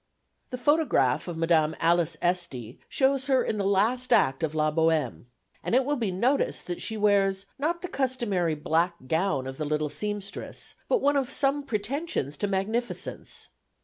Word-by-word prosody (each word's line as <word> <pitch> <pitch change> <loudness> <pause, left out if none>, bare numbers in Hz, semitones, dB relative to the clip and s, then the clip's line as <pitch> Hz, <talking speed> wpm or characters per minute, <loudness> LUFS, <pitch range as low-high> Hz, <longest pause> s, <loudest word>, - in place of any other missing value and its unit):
The 250 - -4
photograph 250 - +2
of 175 -2 -5
Mdme. 165 -2 +2
Alice 170 0 +2
Esty 155 -10 -2
shows 270 0 +2
her 260 -3 +3
in 215 - -2
the - - 0
last 225 +6 +1
Act 135 0 +3
of 160 -1 -2
La 155 0 +2
Bohème; 160 -4 +1 0.4
and - - 0
it 260 0 +3
will 290 +1 +1
be 230 -7 -1
noticed 235 +10 0
that 175 -1 -5
she 220 - -2
wears, 200 -2 +2
not 340 +4 -1
the - - -2
customary 235 - 0
black 165 +3 +1
gown 160 -3 0
of 135 +2 -7
the - - -1
little 150 0 -1
seamstress, 205 +4 -4 0.2
but - - +2
one 285 +1 +3
of 270 -2 0
some 280 +1 +3
pretensions 235 - -3
to 205 - -1
magnificence. 215 +5 -3
195 Hz, 170 wpm, -27 LUFS, 160-255 Hz, 0.4 s, her